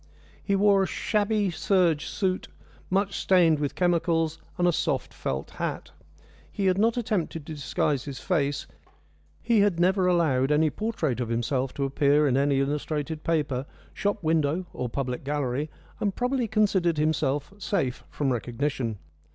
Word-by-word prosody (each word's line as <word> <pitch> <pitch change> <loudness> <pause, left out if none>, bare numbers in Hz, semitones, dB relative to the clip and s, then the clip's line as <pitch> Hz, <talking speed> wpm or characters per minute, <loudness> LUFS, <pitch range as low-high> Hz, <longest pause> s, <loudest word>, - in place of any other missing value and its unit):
He 200 - +1
wore 200 0 +4
a 190 - +1
shabby 210 -1 0
serge 170 -2 +2
suit, 185 -2 -1 0.4
much 195 +1 +1
stained 170 -5 +4
with 145 -2 -2
chemicals, 165 -2 +1 0.2
and 175 - +2
a - - +5
soft - - -1
felt 65 +1 -4
hat. - - -4 0.6
He 200 - -2
had 185 0 +3
not 230 +3 +3
attempted 180 -9 -2
to 160 - -6
disguise 140 -1 -1
his 140 -3 -6
face; 145 -7 0 0.8
he 230 -2 +3
had 200 -4 +3
never 185 +1 +3
allowed 150 -7 +2
any 150 +1 +3
portrait 170 - -2
of 120 -2 -2
himself 125 +3 -1
to 140 - -1
appear 145 +2 +3
in 130 - +2
any 140 0 +2
illustrated 150 +2 -2
paper, 145 -5 0 0.3
shop 205 -1 -1
window, 160 +2 +1
or 125 - -3
public 125 0 -3
gallery, 145 0 -1 0.3
and 200 -2 -1
probably 250 -1 0
considered 195 -6 +2
himself 150 0 0
safe 135 - -1
from 135 -3 0
recognition. 120 -1 -2
160 Hz, 150 wpm, -26 LUFS, 140-190 Hz, 0.8 s, a